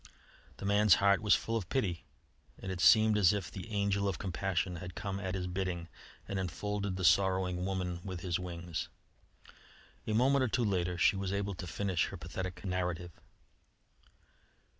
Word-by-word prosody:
The - - -7
man's 100 0 +5
heart 100 0 +3
was 105 -2 +5
full 115 - -2
of 100 -6 -3
pity, 95 -11 -1 0.5
and 95 - -6
it 90 -1 -4
seemed 110 +3 +6
as 95 -1 +5
if 100 -4 -3
the 95 +4 -8
Angel 100 -1 0
of 95 - -1
Compassion 90 -1 -2
had 90 0 -8
come 100 -2 -4
at 95 -1 -3
his 90 -1 -2
bidding 90 -2 -3 0.4
and 100 - -2
enfolded 100 +2 -3
the 95 - -4
sorrowing 90 0 +3
woman 90 -2 -2
with 95 -3 -6
his 90 -1 -1
wings. 85 -2 -5 1.2
A 110 - 0
moment 130 +4 +4
or - - +2
two 120 +1 0
later 90 -3 0
she 95 - +4
was 95 -1 -2
able 100 0 -1
to 90 0 -7
finish 95 +2 0
her - - -7
pathetic 95 0 -6
narrative. 90 -2 -2
95 Hz, 170 wpm, -32 LUFS, 90-100 Hz, 1.2 s, seemed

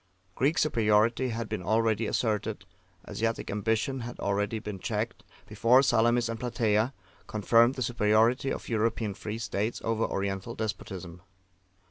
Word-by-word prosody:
Greek 140 - +1
superiority 115 -1 +2
had 115 -1 -3
been - - -4
already 110 +3 +1
asserted, 105 -4 -1 0.4
Asiatic 115 +1 -2
ambition 110 +5 0
had 120 0 -7
already 100 +2 -1
been 105 -3 -6
checked, - - -3 0.2
before 125 +4 +4
Salamis 120 -1 +3
and 115 -1 -4
Platea 115 -1 +1 0.4
confirmed 115 +4 +3
the 130 - -2
superiority 115 +3 +2
of - - -5
European 110 -2 0
free 105 +2 -5
states 105 +1 -2
over 115 0 0
Oriental 100 +3 -3
despotism. 95 -5 -5
110 Hz, 130 wpm, -28 LUFS, 105-120 Hz, 0.4 s, before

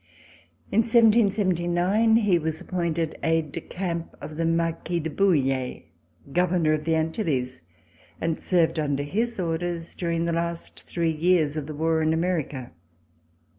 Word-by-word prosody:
In 215 - +3
1779 210 -3 +3
he 205 -6 +3
was 160 0 -3
appointed 170 -3 -2
aide 160 -2 +1
de 165 - -5
camp 170 -2 -4
of 150 +1 -8
the 165 +1 -1
Marquis 165 +1 0
de 160 -1 -4
Bouille, 135 -8 +1 0.5
Governor 175 -3 +2
of 155 0 -2
the 165 -1 +2
Antilles, 155 - -1 0.6
and 165 -1 -2
served 170 -3 +2
under 145 -2 0
his 225 +9 -1
orders 170 0 -3
during 170 -1 -1
the 170 - 0
last 170 0 -3
three 165 -2 0
years 160 -2 +2
of 150 -2 -4
the 155 - -6
war 160 +1 +1
in 155 0 +2
America. 160 - -2
165 Hz, 140 wpm, -25 LUFS, 155-180 Hz, 0.6 s, In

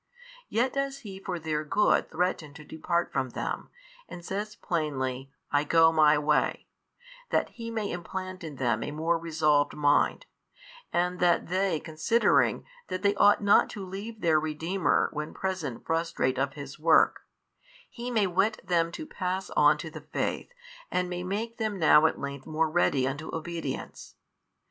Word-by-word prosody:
Yet 245 +3 +1
does 275 0 -2
He 195 -4 -8
for 185 -2 -4
their 155 -2 -2
good 205 +7 +2
threaten 160 -4 -2
to 150 - -11
depart 170 +3 -2
from 130 -2 -1
them, - - -4 0.4
and 175 -1 -9
says 205 +3 -4
plainly 135 -7 -3 0.2
I 145 0 +3
go 165 +1 +5
My 155 -2 +5
way, 150 0 +1 0.6
that - - +1
He 230 -1 -8
may 220 -3 -3
implant 185 +1 -6
in 155 -3 -7
them 120 -4 0
a - - -3
more 165 +3 0
resolved 155 -3 +1
mind, 145 - +2 0.7
and 180 +1 0
that 175 -2 +2
they 185 -3 +1
considering 160 +11 +2 0.2
that 185 - -4
they 200 0 +4
ought 205 +1 +4
not 200 - +5
to 195 - -5
leave 210 +4 -7
their 160 -2 +4
Redeemer 160 +5 0
when 150 0 -5
present 185 -10 -4
frustrate 165 -6 0
of 135 0 0
His 140 -1 -9
work, 160 0 +4 0.7
He 240 0 -7
may 220 -4 +2
whet 195 +4 +1
them 170 -2 +1
to 315 - -6
pass 190 -7 -3
on - - +5
to - - -7
the - - -9
faith - - -3 0.4
and 180 0 -1
may 180 0 -3
make 215 +5 -3
them 215 -2 -1
now 160 -2 +6
at - - -3
length 140 -1 -6
more 155 0 0
ready 140 -6 +2
unto 145 +4 -4
obedience. 165 -4 -6
170 Hz, 165 wpm, -28 LUFS, 150-195 Hz, 0.7 s, now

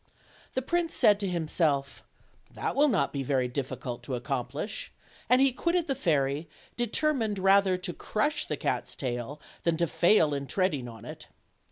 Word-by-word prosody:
The 260 - 0
prince 340 +3 0
said 205 -1 +5
to 200 - -1
himself: 155 -5 0 0.5
"That - - -2
will 290 +2 +5
not 275 - +1
be 140 - -2
very 130 -1 +1
dif 130 +1 -3
ficult 120 -3 -5
to 130 - -4
accomplish;" 135 - -4 0.4
and 250 - +6
he 270 -1 +5
quitted 340 +6 0
the 275 - +1
fairy, 150 - 0 0.3
deter 245 +6 +1
mined 220 -6 -1
rather 195 0 +4
to 180 -1 -5
crush 295 - -1
the - - -3
cat's - - -2
tail 125 +2 -4 0.2
than 170 -1 +1
to 170 - +2
fail 170 -2 +3
in 140 -1 -3
tread 185 +6 +1
ing 130 -4 -4
on 115 -3 -10
it. - - -9
170 Hz, 180 wpm, -28 LUFS, 140-220 Hz, 0.5 s, and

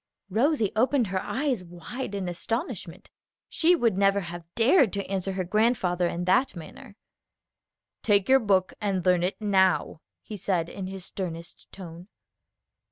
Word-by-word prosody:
Rosie 230 - +2
opened 250 +2 +2
her 185 0 -2
eyes 260 -7 -2
wide 180 +7 -7
in 195 -2 -3
astonishment. 230 - -5 0.4
She 340 +2 +3
would 230 - +1
never 200 0 +3
have 175 -1 -7
dared 240 - +4
to 200 -1 -2
answer 195 0 -3
her 190 -1 -2
grandfather 185 -3 +1
in 175 +1 -3
that 255 +7 +2
manner. 200 +6 -11 1.1
"Take 200 -3 +3
your 265 0 +6
book 195 -5 +1
and 195 -3 -1
learn 180 -1 +4
it 180 +3 -2
now," 190 -6 +2 0.2
he 210 - -7
said 175 -3 -1
in 190 -2 -6
his 190 -1 -7
sternest 170 -3 -7
tone. 175 -1 -10
195 Hz, 150 wpm, -26 LUFS, 180-225 Hz, 1.1 s, your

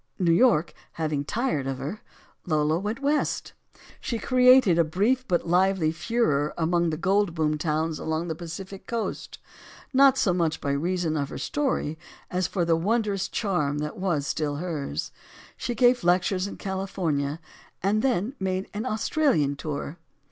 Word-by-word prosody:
New 175 -4 +2
York 170 -4 +4 0.2
having 155 -3 -1
tired 210 - -1
of 135 -1 -2
her, 155 +11 -5 0.5
Lola 155 0 +2
went 215 +7 -4
West. 290 +1 0 0.5
She 235 - -3
created 250 -6 +5
a - - +6
brief, 215 +11 0
but 175 -2 0
lively, 180 -2 +3
furore 155 -6 0
among 170 +1 +1
the 155 - -2
gold 195 0 +1
boom 155 -2 +1
towns 155 0 -1
along 160 +2 -2
the 160 - -2
Pacific 180 +4 -8
coast; 230 -2 -4 0.6
not 270 0 +6
so 195 -8 +2
much 165 -3 0
by 140 - -2
reason 165 +2 0
of 140 -2 -1
her - - -6
story 260 - -1 0.3
as 180 0 0
for 175 -4 -1
the 165 -1 +3
wondrous 205 +2 0
charm 165 -10 -1
that 150 +1 -3
was 175 -7 -1
still 150 -1 -1
hers. 155 -3 -4 0.4
She 240 - -3
gave 245 0 +4
lectures 185 +2 +2
in - - -8
California, 170 -7 -2 0.4
and 205 +3 +2
then 245 -2 0
made 190 0 -2
an 215 +4 -3
Australian 215 - +1
tour. 145 +3 -5
175 Hz, 155 wpm, -26 LUFS, 155-210 Hz, 0.6 s, a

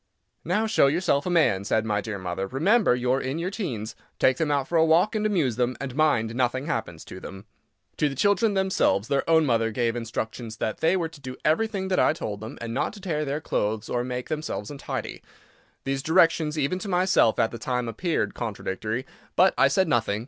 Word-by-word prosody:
"Now, 195 +7 0
show 220 -10 +4
yourself 145 0 +1
a - - 0
man," 155 - +3
said 110 +2 0
my 105 -1 0
dear 105 -1 -5
mother, 95 +1 -4
"remember 170 - +3
you 125 0 0
are 135 - +1
in 130 +4 -3
your 175 +3 -2
teens. 130 - -4 0.2
Take 130 0 +3
them 160 -2 0
out 140 -2 0
for 175 - -3
a 160 - +5
walk 165 +7 +3
and 215 -1 +1
amuse 155 - 0
them; 125 0 0
and 135 -2 -5
mind 140 -8 +2
nothing 130 +2 0
happens 85 - -4
to 95 - -9
them." 95 +2 -10 0.5
To 150 - +2
the 135 - -6
children 205 - +2
themselves 190 - +1
their 140 +3 0
own 160 -1 +5
mother 115 -4 +2
gave 115 +1 -1
instructions 115 -1 -5
that 110 - -3
they 170 +4 +3
were 165 -3 -2
to 160 -3 -15
do 130 -1 -7
everything 190 +4 +1
that 185 - +2
I - - +4
told 105 -10 -5
them, 110 +2 -8
and 115 -1 -5
not 135 - -1
to 210 - -11
tear 155 -6 -2
their 140 +2 -2
clothes 110 -3 -2
or 120 0 0
make 125 0 -4
themselves 150 -8 -4
untidy. 140 - -5 0.6
These 135 0 -2
directions, 160 -1 +3
even 150 +5 0
to 200 - -6
myself, 180 - +3
at 115 -1 +2
the 115 - -7
time, 125 -1 -2
appeared 160 - -1
contradictory. 110 +2 -4 0.3
But 185 +2 +5
I - - +5
said 190 -2 +2
nothing. 110 -7 +1
135 Hz, 215 wpm, -25 LUFS, 115-170 Hz, 0.6 s, a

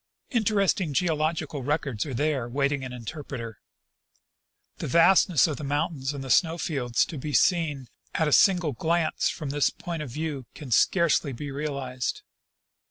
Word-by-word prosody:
Interesting 200 - +1
geological 155 -3 0
records 140 -4 -1
are 135 - -5
there 145 -3 0
Avaiting 140 +1 0
an 130 - -6
interpreter. 125 -2 -7 1.2
The - - -4
vastness 170 +2 +5
of 155 -4 -2
the 150 - -7
mountains 145 -1 -1
and 140 -2 -6
the 130 - -4
snow 165 +2 +3
fields 130 -8 0
to 155 - -7
be 150 +2 -5
seen 150 -8 +2 0.3
at 160 - +2
a - - 0
single 180 -5 +4
glance 160 +5 0
from 145 -3 -5
this 145 0 +2
point 170 -2 -6
of 150 - -5
view 145 -1 -4
can 145 -5 -9
scarcely 160 0 +3
be 140 +4 -6
realized. 135 -3 -3
145 Hz, 155 wpm, -26 LUFS, 135-160 Hz, 1.2 s, vastness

